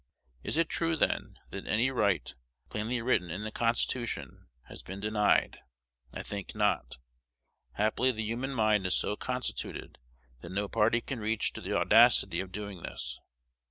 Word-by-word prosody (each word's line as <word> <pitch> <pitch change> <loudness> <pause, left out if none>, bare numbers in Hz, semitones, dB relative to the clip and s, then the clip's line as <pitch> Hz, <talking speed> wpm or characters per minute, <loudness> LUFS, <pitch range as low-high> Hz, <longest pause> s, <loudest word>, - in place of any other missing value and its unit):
Is 150 - -2
it 165 -1 +3
true, 165 0 0
then, - - 0
that - - -7
any 120 +5 +2
right, 100 -7 +1 0.4
plainly 115 +3 -2
written 95 -8 +1
in 90 +6 -4
the 110 - -4
Constitution, 115 - -1 0.2
has - - -11
been 95 +2 -8
denied? 105 0 +2 0.5
I - - -6
think 100 0 -6
not. 105 - 0 0.8
Happily 110 +5 +2
the 110 -2 -3
human 120 +5 -2
mind 105 -4 +3
is 90 - +3
so 105 - +1
constituted, 125 +3 -4 0.4
that - - -9
no 100 +2 -1
party 115 +4 +2
can 135 -1 -5
reach 110 0 0
to - - -7
the - - -1
audacity - - +6
of 95 -1 -4
doing 100 -2 -6
this. - - -4
110 Hz, 160 wpm, -30 LUFS, 100-120 Hz, 0.8 s, audacity